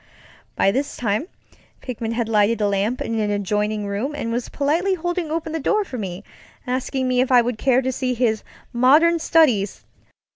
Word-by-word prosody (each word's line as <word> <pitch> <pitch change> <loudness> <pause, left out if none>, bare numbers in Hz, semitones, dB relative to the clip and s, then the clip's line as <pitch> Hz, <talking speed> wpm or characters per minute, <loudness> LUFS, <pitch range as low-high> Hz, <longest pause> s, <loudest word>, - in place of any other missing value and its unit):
By 195 - +3
this 280 +6 -2
time 220 - -1 0.5
Pickman 230 -3 -4
had 235 -1 -1
lighted 220 +1 +2
a 210 - +2
lamp 200 +5 -1
in 225 0 -2
an 210 -1 0
adjoining 210 +1 -1
room 210 +9 -3
and 230 -5 -3
was 240 +1 -3
politely 330 +7 0
holding 350 -1 -3
open 320 0 -3
the 325 - -2
door 425 +9 +1
for 255 -9 -6
me; 190 -1 -5 0.4
asking 260 +1 -2
me 250 0 +2
if 260 - 0
I 245 -1 +6
would 235 -2 -3
care 260 -1 +3
to 260 - 0
see 255 0 -2
his 225 -3 +1 0.3
"modem 300 +8 +4
studies". 265 -12 +2
250 Hz, 185 wpm, -22 LUFS, 215-290 Hz, 0.5 s, I